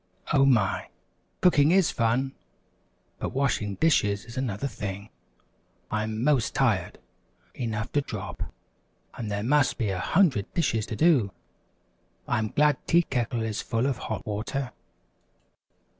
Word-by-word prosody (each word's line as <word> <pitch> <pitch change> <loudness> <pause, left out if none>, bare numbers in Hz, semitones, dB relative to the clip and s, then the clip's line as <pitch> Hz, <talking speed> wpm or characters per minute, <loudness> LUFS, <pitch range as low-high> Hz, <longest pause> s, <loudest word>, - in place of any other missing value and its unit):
"Oh, 135 -2 +5
my, 115 -7 +2 0.5
cooking 155 -5 +5
is 185 -1 +4
fun 125 +4 0 0.9
but - - -3
washing 120 -7 0
dishes 105 -10 +2
is 115 +1 -11
another 130 -3 -2
thing. 100 -3 -6 0.8
I'm 110 +1 -2
'most 140 -4 +2
tired - - +1 0.6
enough 115 -2 -3
to 145 - +2
drop, - - -6 0.7
and 110 -3 -5
there 100 0 -2
must 135 +2 +2
be 110 -4 0
a 95 - -2
hundred 155 - +2
dishes 115 -10 +1
to - - -4
do! 140 - +3 1.0
I'm 110 0 +1
glad 150 +3 +3
Tea 170 +1 +5
Kettle 120 -4 -1
is 110 -1 -2
full 115 +1 -1
of 135 -3 -1
hot 110 - -4
water." 120 +5 -3
120 Hz, 130 wpm, -27 LUFS, 105-140 Hz, 1.0 s, Oh